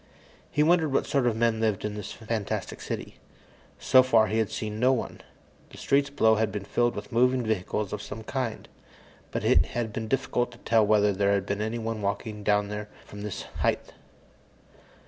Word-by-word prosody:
He 150 - +2
wondered 160 -2 +3
what 135 - +1
sort 135 -3 +1
of 115 - +1
men 115 -1 +1
lived 110 -3 0
in 105 - -3
this 105 -1 -6
fantastic 110 -2 -4
city. - - -6 0.6
So 130 - +6
far, 115 -4 +4
he 110 +2 0
had 110 - +1
seen 105 0 -4
no 130 +2 +4
one. 130 - -3 0.5
The - - -13
streets 140 0 +2
below 110 -6 +3
had 110 -1 +1
been 100 -1 -5
filled 120 +3 +1
with 105 0 -7
moving 125 +2 +3
vehicles 105 -1 -2
of 105 - -4
some 110 +1 -7
kind, 125 -1 -3 0.6
but - - -3
it - - +5
had 115 -3 -2
been 110 +1 -4
difficult 120 0 0
to - - -14
tell 115 -2 +3
whether 105 -1 +4
there 100 +1 +2
had 100 -1 0
been 100 +1 -2
anyone 110 0 -3
walking 105 +1 -3
down 105 0 +1
there 105 0 -5 0.2
from 105 - -10
this 105 -2 -5 0.2
height. - - 0
110 Hz, 190 wpm, -27 LUFS, 105-120 Hz, 0.6 s, So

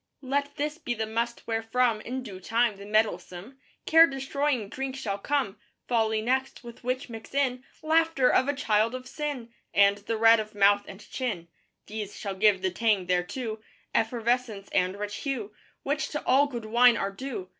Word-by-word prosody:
Let 285 +2 -1
this 300 +2 -3
be 240 -7 -3
the 220 0 -2
must 230 +2 -3
wherefrom, 225 0 +1
In 255 +3 -5
due 195 -6 -8
time, 225 +2 +1
the 200 +1 -10
mettlesome 210 +2 -1 0.3
Care 325 +1 +7
destroying 270 -4 -1
drink 265 +4 -4
shall 205 -7 -3
come. 265 -4 -1 0.3
Folly 220 -2 +1
next: 260 +3 -1
with 235 0 -11
which 255 +1 -2
mix 225 +2 -10
in 260 -2 +1 0.2
Laughter 320 -4 +3
of 260 - +3
a 285 - 0
child 225 -3 +1
of 255 0 -7
sin, 275 -7 -5 0.2
And 200 0 +5
the 220 +2 -3
red 225 0 +6
of 215 -1 -6
mouth 205 0 +4
and 195 - -11
chin. 200 -10 -3 0.4
These 210 -1 -6
shall 200 -2 -4
give 190 -1 +3
the 185 - +1
tang 210 -1 +1
thereto, 215 +6 -2 0.3
Effervescence 230 -2 0
and 185 0 +1
rich 205 0 -4
hue 235 -7 -4 0.3
Which 290 +2 -1
to 295 - -5
all 275 +3 +4
good 240 -5 -6
wine 240 +2 +5
are 195 - -2
due. 210 -4 -6
230 Hz, 175 wpm, -27 LUFS, 205-260 Hz, 0.4 s, Care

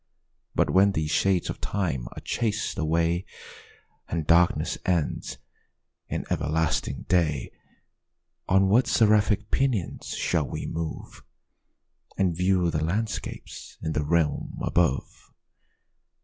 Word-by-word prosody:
But - - +2
when 100 +1 +5
these 80 -2 -1
shades 95 +1 +2
of - - -5
time 80 -12 -2
are - - -8
chas'd 105 -2 -1
away, 85 +2 +1 0.9
And 80 -2 -2
darkness 85 +2 +3
ends 85 -5 -1 0.7
in - - -3
everlasting 80 +2 0
day, 80 -7 +1 1.0
On 95 +1 +4
what 115 +5 +4
seraphic 105 -1 +3
pinions 125 -11 -1
shall 80 -5 0
we - - -5
move, 80 -1 -5 1.0
And 90 -4 +1
view 90 -1 +2
the 75 -1 -1
landscapes 105 +7 -4
in 80 - -1
the 75 -1 0
realms 75 -1 0
above? 85 -7 0
85 Hz, 110 wpm, -26 LUFS, 80-100 Hz, 1.0 s, when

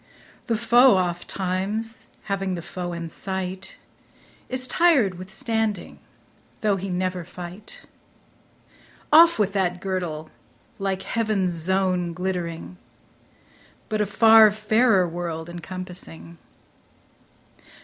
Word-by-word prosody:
The 230 -2 +1
foe 240 0 +5
ofttimes, 190 +5 -3 0.2
having 195 -2 -2
the 170 - -6
foe 180 -1 -5
in 170 -1 -5
sight, 190 +2 -5 0.7
Is 255 0 -2
tired 255 - +3
with 185 +1 -9
standing, 220 -2 -2 0.6
though 210 -2 +2
he 195 +1 -5
never 185 0 -2
fight. 180 +3 -10 1.3
Off 335 +2 +8
with 205 -3 +1
that 180 -3 0
girdle, 175 -5 -4 0.5
like 195 -1 -2
heaven's 215 -6 0
zone 180 0 0
glittering, 180 -1 -4 1.1
But 215 -1 0
a 210 - +1
far 220 +1 +7
fairer 215 -2 +3
world 165 -1 -5
encompassing. 175 - -8
190 Hz, 100 wpm, -24 LUFS, 175-215 Hz, 1.3 s, Off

